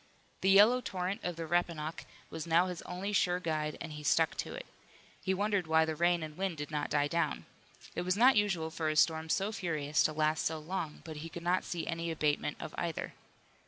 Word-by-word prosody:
The 190 - +3
yellow 210 +6 +7
torrent 185 -2 -3
of 175 -1 -2
the 165 0 -5
Rappahannock 165 -2 -1 0.3
was 160 +1 -5
now 170 +2 +4
his 180 -2 -5
only 190 +3 -4
sure 180 -2 +2
guide 155 -3 -2
and 165 - -6
he 150 - -7
stuck 150 - +3
to - - -4
it. - - -7 0.6
He 190 - -1
wondered 200 -2 0
why 160 0 +4
the 160 0 -2
rain 175 +1 +2
and 155 -1 -7
wind 190 -2 -2
did 150 +1 -5
not 150 -1 -2
die 145 -1 +2
down. 170 +3 -1 0.5
It - - -2
was 185 +2 0
not 255 +3 +6
usual 185 -6 +1
for 160 -1 -1
a 155 - -1
storm 160 +1 +3
so 195 +5 +1
furious 155 -7 0
to - - +2
last 155 0 +1
so 160 - -1
long, 160 0 -5
but 160 -2 -7
he 160 +2 -6
could 170 +1 -8
not 180 +2 +2
see 170 -2 -4
any 165 0 -3
abatement 150 -2 0
of 155 - -7
either. 170 -2 -3
165 Hz, 220 wpm, -32 LUFS, 155-185 Hz, 0.6 s, yellow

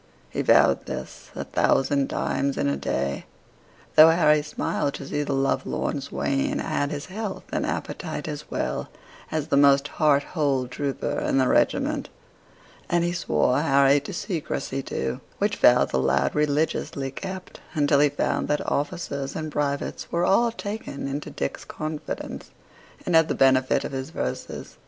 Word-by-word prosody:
He - - -1
vowed - - +4
this - - -7
a - - -3
thousand 135 0 +1
times 140 0 -1
in - - +1
a 70 - +1
day, 70 0 -2 0.7
though 155 +1 +10
Harry 155 -2 +4
smiled 145 -1 -2
to 140 - -7
see 145 - -1
the 145 - -2
love 135 0 +1
lorn 140 - -2
swain 135 0 -1
had 145 - -1
his 145 -1 -5
health 200 +1 -5
and - - 0
appetite - - -4
as - - -6
well - - -2 0.4
as 155 -2 -2
the 140 - +3
most 140 0 +5
heart 145 -2 +5
whole 140 -6 +1
trooper 140 +1 -2
in - - 0
the 130 -1 +3
regiment: - - +1 0.8
and 175 0 +2
he 175 0 0
swore 145 -5 +1
Harry 140 -2 +4
to 140 - -8
secrecy 155 -7 -3
too, 65 - -3 0.2
which - - 0
vow - - +6
the 65 - -1
lad 70 +1 +2
religiously 150 -2 0
kept, 190 +5 -7 0.2
until 145 -2 +3
he 145 0 +5
found 145 - -1
that 150 0 0
officers 140 -2 -2
and 155 -1 -4
privates 140 -1 -2
were 170 +1 +1
all 230 +6 +4
taken 205 -11 -5
into 140 +2 -4
Dick's 70 - -4
confidence, 155 0 -6 0.6
and 180 - -1
had 160 -1 +6
the - - -1
benefit 130 -1 +3
of - - -4
his 135 +1 -4
verses. 110 - -5
145 Hz, 160 wpm, -25 LUFS, 135-155 Hz, 0.8 s, though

